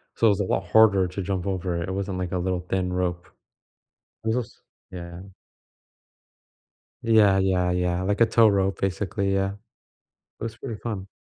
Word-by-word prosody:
so 115 - +3
it - - +6
was 100 -1 +1
a - - +1
lot 95 +1 -1
harder 100 -4 +5
to 90 +3 -5
jump 95 -1 -3
over 90 -3 -2
it; 85 - -4
it - - -2
wasn't 95 0 -3
like 90 -1 -3
a 95 - -1
little 90 0 -1
thin 90 -1 -1
rope. 90 -1 -2 1.0
This 110 +1 0
was 125 -3 -5 0.3
Yeah. 85 -1 -8 1.8
Yeah, 110 -4 +5
yeah, 95 -2 +2
yeah, 90 0 0
like 100 +3 -1
a - - +8
tow 115 0 +5
rope, 95 -1 +1
basically, 95 +2 -1
yeah. 95 0 +1 0.9
It - - -7
was 115 -1 -5
pretty 115 -5 -6
fun. 100 -5 -5
95 Hz, 175 wpm, -25 LUFS, 90-105 Hz, 1.8 s, a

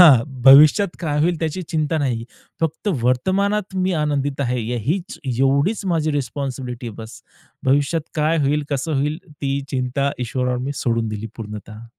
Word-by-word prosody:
हां, 140 -10 +9 0.2
भविष्यात 150 +9 +8
काय 150 -4 -1
होईल 170 +2 +2
त्याची 165 +3 -2
चिंता 155 -1 -1
नाही. 120 -5 -1 0.4
फक्त 165 +5 -1
वर्तमानात 190 - +1
मी 185 0 +1
आनंदित 145 -2 -1
आहे, 125 -2 0
यहींच 135 - -2
एवढीच 135 - +1
माझी 160 -3 +1
रिस्पॉन्सिबिलिटी 130 -2 -4
आहे 110 - -9
बस. 115 +3 -11 0.5
भविष्यात 145 +4 +2
काय 155 +1 +2
होईल, 145 +2 +1
कसं 140 +3 -1
होईल, 150 +3 -1
ती 140 -2 -3
चिंता 130 +2 0
ईश्वरावर 125 +1 -1
मी 135 +3 -3
सोडून 115 -4 0
दिली 110 0 -4
पूर्णतः. 105 0 -8
140 Hz, 150 wpm, -21 LUFS, 125-160 Hz, 0.5 s, हां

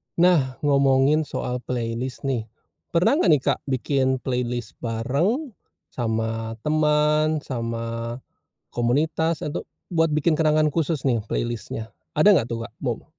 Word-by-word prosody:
Nah, 165 -7 +3
ngomongin 140 +1 +3
soal 125 -1 -3
playlist 120 +1 -4
nih. 125 -5 -1 0.4
Pernah 180 - +3
gak 175 - +4
nih, 140 - -2
Kak, - - +1
bikin 130 0 +1
playlist 125 -3 -2
bareng 140 - -1 0.4
sama 115 -1 -2
teman, 150 0 +2
sama 115 -1 -4 0.6
komunitas 155 +7 0
atau, 145 - -4 0.2
buat 165 -1 +3
bikin 155 +1 +2
kenangan 155 -1 +3
khusus 160 -3 0
nih 120 -4 +2
playlist-nya, 115 -1 -3 0.2
ada 155 +8 +6
nggak 120 - +2
tuh 115 -1 -3
gak, - - -13
Kak? - - -49
mo - - -2
135 Hz, 130 wpm, -24 LUFS, 120-155 Hz, 0.6 s, ada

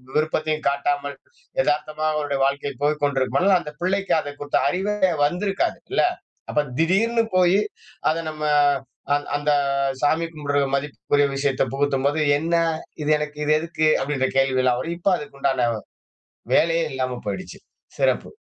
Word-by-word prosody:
விருப்பத்தையும் 155 0 0
காட்டாமல், 140 0 -1 0.5
எதார்த்தமா 155 - -1
அவருடைய 145 -2 -1
வாழ்க்கை 140 +1 -1
போய் 150 +1 +1
கொண்டிருக்கும் 135 -2 +1
பொழுது, 190 +1 +4
அந்த 150 -3 -7
பிள்ளைக்கு 195 +2 0
அத 145 -2 -5
குறித்த 145 0 0
அறிவே 190 +7 0 0.3
வந்திருக்காது 195 +6 +1 0.2
இல்ல! - - +3 0.5
அப்ப 150 - +1
திடீர்னு 220 +8 +2
போயி 185 +2 +4 0.5
அதை 165 +1 0
நம்ம 155 -1 -8 0.7
அந் 145 - -3
அந்த 145 +1 +1 0.5
சாமி 160 +3 +2
கும்பிடுற 145 -2 -1 0.2
மதிப்புக்குரிய 145 0 0
விஷயத்தை 135 -1 +1
புகுத்தும்போது. 140 +1 +1 0.2
"என்னா? 165 +2 +1 0.4
இது 150 - -2
எனக்கு 150 0 -5
இது 150 - +3
எதுக்கு?" 160 -1 0
அப்படின்ற 135 -1 0
கேள்வி 135 -1 +3
எல்லாம் 125 -1 +3
வரும். 165 +6 -3
இப்ப 195 +3 +2
அதுக்குண்டான 135 -4 -1 0.9
வேலையே 165 0 +3
இல்லாம 130 -2 -2
போயிடுச்சு. 185 - -6 0.4
சிறப்பு. - - +1
150 Hz, 135 wpm, -23 LUFS, 140-165 Hz, 0.9 s, பொழுது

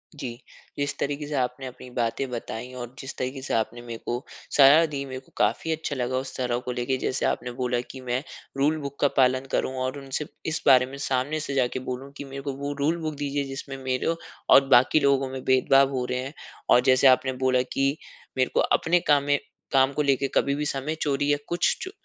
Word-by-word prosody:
जी, 125 -5 -6 0.4
जिस 145 0 -1
तरीके 145 +1 -2
से 150 - -5
आपने 125 0 -1
अपनी 125 0 -10
बातें 120 +2 -1
बताई 120 +1 -5
और 120 0 -7
जिस 135 - -7
तरीके 130 +1 -3
से 135 - -4
आपने 115 +1 -1
मेरे 120 -1 -7
को 120 +2 -2 0.3
साहारा 150 +4 +8
दी 145 -3 -4
मेरे 130 -1 -6
को 130 - -24
काफ़ी 115 +10 +1
अच्छा 160 -2 -2
लगा 130 0 -1
उस 130 0 -5
तरह 125 -2 0
को 125 - -2
लेके, 125 +2 -1
जैसे 130 - -1
आपने 125 +1 -1
बोला 125 0 -1
कि 130 - -9
मैं 125 +2 -2 0.3
रूल 150 +3 +2
बुक 140 0 -7
का 145 - +4
पालन 130 0 +3
करूँ 130 - 0
और 130 +2 -2
उनसे 135 +2 -4 0.2
इस 160 - -2
बारे 125 -1 +7
में 135 +2 -9
सामने 140 +2 -1
से 145 -2 -4
जाके 130 -1 +1
बोलूँ 130 +2 -5
कि - - -5
मेरे 135 0 -7
को 140 0 -4
वो 140 +1 -3
रूल 155 +4 +1
बुक 155 -1 -3
दीजिए 145 0 -2
जिसमें 135 0 -6
मेरे 130 +5 0 0.3
और 135 - +8
बाकी 130 +5 +5
लोगों 140 -1 +2
में 130 0 -6
भेदभाव 135 +1 +4
हो 130 -2 -1
रहे 125 - -1
हैं। 135 +4 -5 0.4
और 125 - +7
जैसे 130 +2 +5
आपने 130 0 +4
बोला 130 -1 +4
कि 135 +2 +1 0.4
मेरे 130 - +2
को - - +2
अपने 175 +2 +3
काम 145 -1 +5
में 145 0 +2 0.4
काम 135 +1 +4
को 150 - 0
लेके 140 -1 +2
कभी 140 - +2
भी 150 +1 -2
समय 145 +2 -2
चोरी 145 0 +1
या 145 - +3
कुछ 175 0 +1
च - - -7
135 Hz, 225 wpm, -26 LUFS, 125-140 Hz, 0.4 s, साहारा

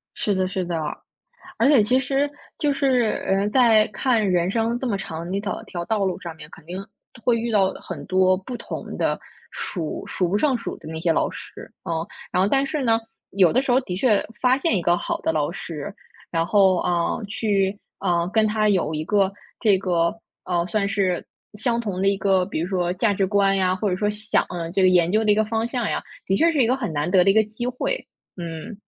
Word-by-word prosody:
是 205 - 0
的 185 0 +1
是 185 0 -2
的。 170 -1 -2 0.8
而 235 - +3
且 280 -5 +6
其 250 +5 +3
实 275 +2 0 0.3
就 290 -2 +1
是， 260 -5 +2 0.2
呃， 195 +1 +2
在 225 -3 +5
看 225 +1 +1
人 175 0 +2
生 230 +2 0
这 260 - -2
么 205 - 0
长 170 -3 -6
的 195 - -1
一 - - 0
条 205 0 -4
条 175 -2 -6
道 215 -3 0
路 185 - -2
上 170 -2 -7
面， 150 -1 -12
肯 160 - -15
定 175 +3 -6 0.5
会 240 -2 +3
遇 235 +1 -2
到 195 -3 +3
很 160 -6 -8
多 185 0 +4
不 215 +7 -7
同 - - -7
的， - - 0 0.3
数 165 -5 -4
数 180 - 0
不 195 +4 +1
胜 270 +1 +2
数 230 - -5
的 - - -12
那 160 0 -5
些 165 0 +1
老 - - +1
师。 - - -10
嗯， 165 0 -2 0.3
然 180 - +2
后 195 - +3
但 275 0 +3
是 290 0 -2
呢， 225 -2 +3 0.3
有 185 -4 +4
的 255 - +4
时 270 - -1
候 250 - +5
的 185 -8 -5
确 210 +1 +2 0.2
发 255 0 +4
现 325 -3 +1
一 185 - +1
个 175 +1 +2
好 - - -3
的 - - +1
老 155 -1 0
师， 170 +2 -6 0.4
然 165 -1 +1
后， 190 -1 +4
啊， 170 +3 0
去， 200 -2 0 0.2
啊， 175 -3 +1
跟 215 +3 +2
他 215 0 +1
有 190 -6 +2
一 155 0 -3
个 195 0 +2 0.3
这 210 -5 +4
个 175 -1 +1 0.3
啊， 175 -1 0
算 200 +2 0
是 195 -4 0 0.3
相 235 +3 0
同 200 -5 -3
的 195 - +2
一 200 0 +3
个， 190 -2 +2
比 195 - -3
如 170 - -1
说 180 -2 0
价 205 +3 +1
值 195 -1 +1
观 195 0 +3
呀， 185 -1 +2
或 205 +2 -2
者 180 - 0
说 205 +3 0
想 210 +1 0
啊， 170 -2 -4
这 190 +2 +1
个 185 - +6
研 175 -1 +4
究 220 +1 +2
的 215 - +3
一 205 - +4
个 220 - +2
方 225 +1 -1
向 240 -3 -2
呀。 - - -1 0.2
的 195 - +1
确 330 +10 +4
是 290 -5 +3
一 - - +2
个 250 - +3
很 240 -9 -3
难 150 +2 -1
得 185 -2 +6
的 195 - +3
一 - - +5
个 220 +1 +5
机 220 +3 -5
会， 255 - -2 0.3
嗯。 170 +4 -7
200 Hz, 255 characters per minute, -23 LUFS, 180-225 Hz, 0.8 s, 且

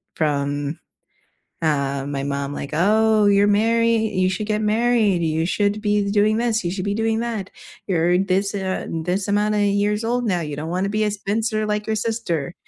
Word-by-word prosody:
from 145 -1 -1 0.8
uh, 140 -3 0
my 140 -1 -3
mom, 140 0 -3
like, 140 - -6
"Oh, 215 +5 +3
you're 200 0 +4
married 225 +1 +2
you 185 0 +2
should 210 +3 -3
get 215 0 0
married, 215 -4 +2
you 160 +1 0
should 205 +3 0
be 205 -1 +1
doing 210 +1 +3
this, 230 -3 0
you 175 - 0
should 185 -1 -4
be 200 0 -1
doing 225 0 0
that. 220 -5 -4 0.4
You're 175 -1 +2
this 195 +1 0
and, 185 -4 -3
uh - - +1
this 195 +2 -1
amount 210 +1 +1
of 205 - +1
years 205 +2 +1
old 245 +1 0
now, 180 -5 0
you 150 -2 -4
don't 160 +2 -4
want 185 +2 -1
to - - -1
be 215 +1 0
a 210 - 0
spinster 215 +2 -1
like 210 0 -2
your 220 - 0
sister." 190 -9 -2
200 Hz, 200 wpm, -21 LUFS, 170-215 Hz, 0.8 s, you're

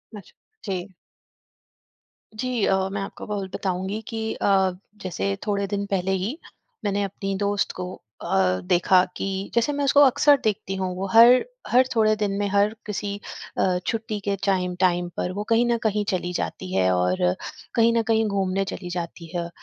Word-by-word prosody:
अच्छा। 200 - -12 0.3
जी। 190 -1 -3 1.5
जी। 245 -1 -1
अ, 190 - +3
मैं 200 0 -3
आपको 195 - -7
ब 205 -1 -2
बताऊँगी 190 +3 -2
की 225 -2 -4
अ, 190 -2 +2 0.3
जैसे 100 - -2
थोड़े 200 -1 0
दिन 200 0 -2
पहले 190 -1 0
ही 245 - -3 0.5
मैंने 205 0 +1
अपनी 195 0 -3
दोस्त 205 0 0
को 180 - -3 0.3
अ, 95 -1 +1
देखा 180 - +4
कि - - -3 0.3
जैसे 235 +5 +2
मैं 285 - +1
उसको 280 +1 +4
अक्सर 285 +1 +6
देखती 210 -2 -1
हूँ, 185 -1 -2
वो 190 +2 -3
हर 235 +3 +8 0.2
हर 255 +2 +5
थोड़े 215 -1 +4
दिन 210 -2 -1
में 205 - 0
हर 205 +2 +2
किसी 205 -1 -3 0.4
अ, 185 -1 +2
छुट्टी 220 -2 -2
के 200 - +2
चाइम 180 -2 +1
टाइम 175 -1 +2
पर 180 - -1
वो 205 +2 -3
कहीं 230 +1 +4
न 235 - +2
कहीं 210 -1 +1
चली 180 -1 -2
जाती 95 - -4
है 95 -1 +3
और 90 0 +1 0.6
कहीं 230 0 +4
न - - +4
कहीं 225 0 +2
घूमने 195 -1 0
चली 180 -2 -7
जाती 170 -1 -5
है। 170 -1 -2
200 Hz, 175 wpm, -24 LUFS, 180-215 Hz, 1.5 s, हर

